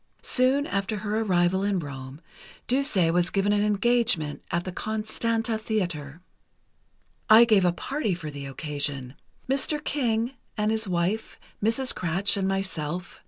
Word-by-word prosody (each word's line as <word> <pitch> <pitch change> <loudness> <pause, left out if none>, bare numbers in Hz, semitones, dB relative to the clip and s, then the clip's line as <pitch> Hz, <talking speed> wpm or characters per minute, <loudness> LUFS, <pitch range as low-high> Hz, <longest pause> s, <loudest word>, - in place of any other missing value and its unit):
Soon 265 +3 +3
after 200 0 -2
her 210 +1 -2
arrival 185 -3 +2
in 200 -1 +1
Rome, 140 -2 -7 0.4
Duse 275 +1 +2 0.2
was 175 0 +2
given 200 +1 +1
an 205 - +2
engagement 210 -7 +1
at 175 +1 -1
the 185 - -4
Constanta 220 +2 -2
Theatre. 175 -9 -3 1.1
"I 220 +2 +9
gave 210 -5 +4
a 175 - +4
party 220 - -2
for 155 -3 -7
the 140 -1 -7
occasion—Mr. 145 - -3
King 235 -4 0 0.3
and 210 +1 +1
his 220 -1 0
wife, 180 +5 -1 0.2
Mrs. 230 +4 +1
Kratsch 185 +3 0
and 195 -1 0
myself. 180 -3 -3
200 Hz, 135 wpm, -26 LUFS, 170-225 Hz, 1.1 s, I